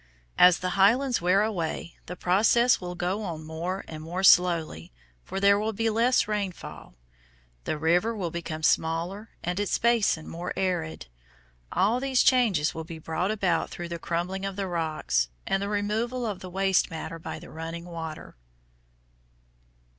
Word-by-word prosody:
As 180 -1 +8
the 185 0 -3
highlands 240 +7 +3
wear 185 +4 +3
away 170 -5 -3
the 180 - -5
process 220 +8 +3
will 180 0 -5
go 180 +4 -2
on 165 -6 -5
more 170 +5 -4
and 155 -1 -8
more 175 +4 -4
slowly, 170 - +4 0.3
for 195 - -4
there 200 +1 +5
will 220 +1 -1
be 225 +2 0
less 235 +3 +3
rainfall. 200 - -5 0.7
The 155 - -1
river 175 +9 +2
will 180 -6 -3
become 160 -2 -5
smaller 170 +7 0
and 180 +2 -2
its 205 - 0
basin 225 -9 +2
more 175 +2 -5
arid. 175 - -2 0.7
All 215 +6 +2
these 265 -1 +2
changes 215 - +3
will 160 - -5
be 165 0 -8
brought 165 +4 -2
about 190 -6 0
through 175 -1 -7
the 170 0 -5
crumbling 175 +4 -3
of 195 -1 -3
the 200 0 -2
rocks, 155 - -1 0.2
and 195 - 0
the 200 - -2
removal 220 +4 -1
of 205 -4 -3
the 185 - -8
waste 190 +1 +2
matter 165 0 -6
by - - -6
the 175 - -12
running 165 +1 -6
water. 165 -3 -7
180 Hz, 160 wpm, -27 LUFS, 165-205 Hz, 0.7 s, As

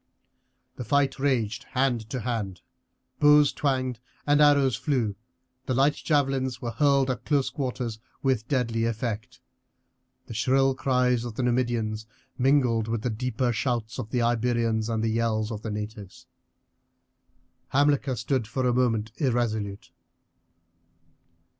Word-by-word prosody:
The 125 - -4
fight 140 +3 +1
raged 120 -6 0
hand 125 -5 0
to 130 0 -3
hand, 105 -6 -3 0.6
bows 150 -1 +6
twanged 130 -4 -1 0.3
and 145 0 +4
arrows 140 -4 +5
flew, 120 -4 -1 0.5
the 130 - 0
light 140 +3 +4
javelins 135 -5 0
were 120 - -4
hurled 135 +2 +3
at 120 - -5
close 140 -3 +1
quarters 125 -5 -3 0.2
with 130 -4 +1
deadly 115 -5 0
effect, 115 +1 -4 0.8
the - - -8
shrill 135 +4 +2
cries 125 -2 +1
of 120 -3 -6
the 130 - -2
Numidians 120 -3 0 0.3
mingled 125 -4 +2
with 115 -1 -2
the 125 - 0
deeper 120 +2 -1
shouts 115 0 -2
of 110 -4 -5
the 120 0 0
Iberians 115 -1 +1
and 110 -1 -1
the 115 - +1
yells 110 -1 0
of 105 -2 -5
the 110 - -5
natives. 105 -2 -7 1.4
Hamilcar 140 -1 +2
stood 120 0 -1
for 130 +3 -2
a 125 - +2
minute 115 -3 +1
irresolute. 110 -7 -1
120 Hz, 135 wpm, -26 LUFS, 110-135 Hz, 1.4 s, bows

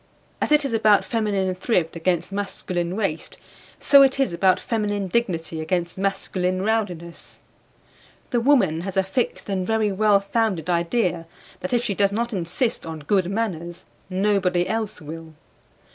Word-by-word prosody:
As - - 0
it 300 -1 +5
is 265 - -2
about 215 -2 +4
feminine 205 -5 0
thrift 180 -3 0
against 170 +2 -1
masculine 185 -3 -3
waste, 195 -7 -3 0.4
so 280 -1 +6
it 270 0 +4
is 270 -10 +1
about 185 +2 +3
feminine 205 -4 -2
dignity 170 -6 -1
against 170 +1 -2
masculine 185 -1 -1
rowdiness. 185 -6 -3 0.9
The 240 - +1
woman 230 - +3
has 195 +1 -5
a 190 - +4
fixed 190 +6 -2
and 190 -2 -2
very 220 -2 +1
well 205 +1 +4
founded 200 -5 -1
idea 170 -1 0 0.3
that 185 - -5
if 240 -1 +1
she 205 - -1
does 200 0 +2
not 235 +3 -2
insist 190 +7 -1
on 160 -1 -7
good 185 +3 +1
manners 180 -5 -3 0.2
nobody 185 -2 +1
else 215 -4 -3
will. 160 +1 -9
195 Hz, 150 wpm, -23 LUFS, 175-220 Hz, 0.9 s, so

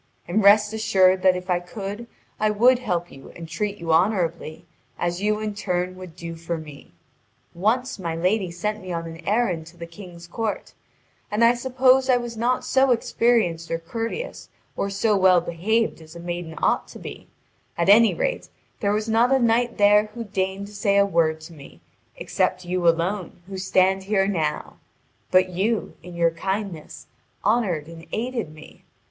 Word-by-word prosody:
And 195 +5 +1
rest 210 +1 +6
assured 190 -4 +3
that 185 -1 +4
if 180 0 -6
I 180 -1 +1
could 200 +5 -7 0.3
I 215 - +2
would 240 +4 +4
help 180 -8 -2
you 135 - -13
and 165 -1 -8
treat 200 +5 -3
you 165 -3 -1
honourably, 170 -3 0 0.3
as 175 +1 -2
you 210 +1 +1
in 215 -1 -3
turn 185 -3 -2
would 185 -3 -11
do 170 -1 -7
for 165 +1 -4
me. 150 -3 -11 0.6
Once 220 +7 0
my 165 -3 -3
lady 185 +3 0
sent 210 +5 -3
me 185 -1 -7
on 165 -1 -3
an 165 0 -9
errand 190 -7 0
to 170 +1 -15
the 170 - -7
King's 170 0 -12
court, 215 +4 -4 0.6
and 210 +3 +1
I 235 +1 +6
suppose 260 +1 +3
I 250 - +5
was 240 -1 -5
not 240 +3 0
so 270 0 +3
experienced 225 -8 +1
or 165 - -1
courteous 230 - -5 0.3
or 200 - -2
so 205 +2 +1
well 185 -2 +5
behaved 180 +5 -1
as 160 +1 -14
a - - -8
maiden 175 -1 -5
ought - - +2
to - - -11
be; - - -9 0.5
at 170 - 0
any 220 +3 +6
rate, - - -2 0.3
there 200 -2 +1
was 215 +1 -1
not 230 +3 +3
a 270 - +5
knight 235 0 +1
there 205 +1 +5
who 235 - -4
deigned 195 -1 -3
to 205 - -13
say 200 -1 +1
a 200 - +5
word 165 -4 +1
to 165 +2 -11
me 140 - -14 0.4
except 185 - -1
you 180 -1 0
alone 175 +2 0
who 190 0 -7
stand 190 0 +2
here 195 -1 +2
now; 160 -6 -2 0.5
but 185 0 +4
you, 205 +5 -1
in 180 -1 -11
your 170 -1 +2
kindness, 190 -1 -5 0.4
honoured 200 -8 +1
and 165 0 -12
aided 235 -6 -3
me. 155 0 -15
190 Hz, 180 wpm, -23 LUFS, 170-220 Hz, 0.6 s, rest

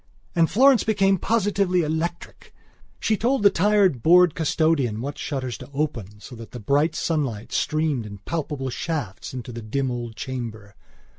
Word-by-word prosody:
And 165 -1 +3
Florence 265 +2 +5
became 195 -3 +2
positively 200 -4 +1
electric. 160 +2 -4 0.4
She 220 - +1
told 245 +2 0
the 200 - +7
tired, 195 - +3
bored 175 +1 +6
custodian 155 -8 +1
what 140 +4 -5
shutters 130 -4 -4
to - - -10
open; 115 -9 -3
so 125 +3 -11
that 115 0 -11
the 125 - -6
bright 145 +8 +1
sunlight 135 -12 -2
streamed 155 -7 0
in 100 -1 -9
palpable 140 +3 -4
shafts 145 - -4
into 125 -2 -7
the 115 0 -7
dim 130 +4 -2
old 120 -2 -5
chamber. 115 -7 -6
150 Hz, 155 wpm, -24 LUFS, 120-180 Hz, 0.4 s, the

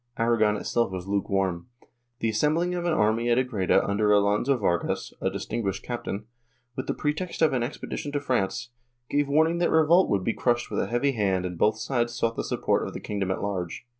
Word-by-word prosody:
Aragon 115 -2 +2
itself 115 0 0
was 95 0 -5
lukewarm. 95 -2 -1 0.5
The 115 - +1
assembling 155 +11 +1
of 175 -1 -2
an 175 - +2
army 115 -2 +2
at 120 - +3
Agreda 120 -8 +2
under 105 +1 +1
Alonso 105 +6 +3
Vargas, 90 -6 -1
a - - +1
distinguished 100 -5 -3
captain, 115 -3 -4 0.5
with 130 - -4
the - - -1
pretext 160 +3 -2
of 155 - +4
an 125 - +1
expedition 140 +3 -4
to 145 - +1
France, 120 -3 -1 0.4
gave 145 0 +2
warning 160 +4 +3
that 175 - +2
revolt 160 +4 +4
would 100 -2 +1
be 115 - 0
crushed 120 -1 0
with - - -1
a - - 0
heavy 120 +4 +1
hand 95 -6 0
and 90 -1 -4
both 110 +5 +2
sides 120 0 -1
sought 115 -1 0
the - - -2
support - - 0
of - - -8
the - - -4
kingdom 100 -3 -3
at 95 - -2
large. 95 0 -4
115 Hz, 200 wpm, -26 LUFS, 100-140 Hz, 0.5 s, of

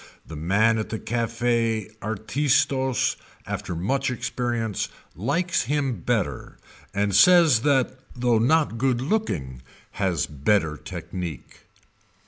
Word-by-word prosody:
The 80 - -9
man 105 +8 +2
at 110 - -4
the 110 - -3
Cafe 115 -1 0
Artistos 130 +4 +1 0.3
after 90 - -4
much 135 +11 0
experience 120 -3 -2 0.3
likes 150 - 0
him 135 -4 -1
better - - -2 0.3
and 100 -1 0
says 165 - +7
that 130 -1 +1 0.2
though 120 -2 +2
not 130 -1 +2
good 130 -1 +1
looking 95 - -2 0.3
has 95 -4 0
better 75 +2 +1
technique. 85 -4 -7
115 Hz, 110 wpm, -24 LUFS, 95-130 Hz, 0.3 s, says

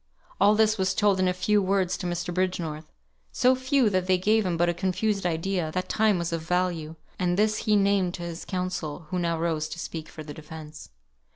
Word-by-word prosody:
All 205 +2 +5
this 220 -1 +3
was 190 0 +1
told 205 -3 +3
in 185 - +3
a - - +3
few 205 +3 +2
words 190 -1 +1
to 180 - -3
Mr. 175 0 -3
Bridgenorth 170 -4 -2 0.4
so 255 +1 +4
few, 260 -1 +2
that 185 -1 0
they 185 -1 +4
gave 215 +2 +2
him 170 -2 -1
but 175 +1 +3
a 175 - +2
confused 190 +2 0
idea, 170 0 -1
that 185 - -2
time 215 -3 +3
was 170 -1 -2
of 165 - -1
value; 170 -2 -1 0.2
and 175 0 +1
this 215 +1 +2
he 210 - +5
named 195 -3 +2
to 175 - -7
his 170 0 -6
counsel, 180 -4 -4
who 180 - 0
now 170 -1 0
rose 160 -2 -1
to - - -7
speak 160 -2 -6
for 155 - -9
the 150 -1 -8
defence. 155 0 -10
180 Hz, 215 wpm, -26 LUFS, 165-200 Hz, 0.4 s, All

